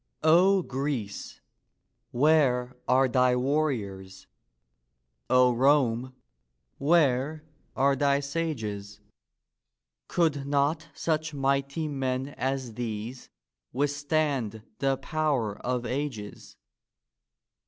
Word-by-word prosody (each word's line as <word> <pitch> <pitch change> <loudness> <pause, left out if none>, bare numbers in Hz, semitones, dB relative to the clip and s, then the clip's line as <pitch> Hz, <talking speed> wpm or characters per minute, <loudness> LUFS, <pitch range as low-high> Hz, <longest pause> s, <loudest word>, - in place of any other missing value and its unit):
O 180 +4 +5
Greece, 130 -7 -4 0.7
where 130 -3 +2
are 130 +1 +4
thy 125 0 +3
warriors? 120 -9 -2 1.0
O 125 -1 +5
Rome, 130 -1 +2 0.6
where 150 -1 +2 0.3
are 135 +1 +3
thy 140 +1 +2
sages? 115 -10 -4 1.1
Could 150 -5 0
not 145 +3 +1
such 155 -2 -1
mighty 140 +3 0
men 135 -2 -2
as 130 -3 -3
these 115 +2 -5 0.4
withstand 145 -5 -1 0.2
the 135 -1 +1
power 140 - -1
of 125 -1 -2
ages 125 -7 -5
135 Hz, 80 wpm, -27 LUFS, 125-150 Hz, 1.1 s, O